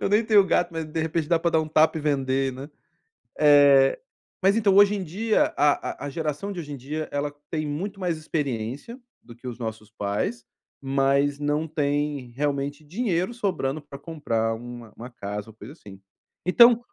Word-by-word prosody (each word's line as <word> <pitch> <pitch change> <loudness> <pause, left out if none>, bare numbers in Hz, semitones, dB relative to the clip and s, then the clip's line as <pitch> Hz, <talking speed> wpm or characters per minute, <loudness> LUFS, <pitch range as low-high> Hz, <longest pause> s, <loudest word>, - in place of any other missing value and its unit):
"Eu - - 0
nem 210 +3 +3
tenho 210 -3 +5
gato, 175 -1 +1
de 155 +1 -3
repente 160 -1 -1
dá 170 -1 +3
para 170 - +1
dar 160 - +4
um 155 - -3
tapa 155 +1 +3
e - - -5
vender", 135 -2 0
né? 135 +4 -9 0.7
Eh, 145 -2 +6 0.4
mas 195 +2 +5
então, 205 -4 +3
hoje 200 0 +7
em 195 - -3
dia 210 +7 +1
a 145 0 +1
a - - -3
geração 155 +5 -3
de 185 - -6
hoje 150 -3 -7
em 140 - -5
dia, 150 +5 -5
ela 145 0 -2 0.2
tem 155 -1 -2
muito 190 +8 -4
mais 180 -3 -1
experiência 145 - -4 0.2
do 120 - -13
que 120 +2 -11
os 120 -1 -6
nossos 110 -3 -6
pais, 105 +3 -3 0.3
mas 140 +1 +1
não 150 +2 0
tem, 145 -3 -1
realmente, 140 +3 -2
dinheiro 185 +2 -1
sobrando 170 - -2
pra 140 -1 -11
comprar 125 -8 -2
uma 120 -1 -9
uma 120 +2 -9
casa 105 -2 -6
ou - - -13
coisa 110 +5 -11
assim. 100 - -14 0.5
Então, 235 +5 +7
145 Hz, 185 wpm, -25 LUFS, 130-170 Hz, 0.7 s, hoje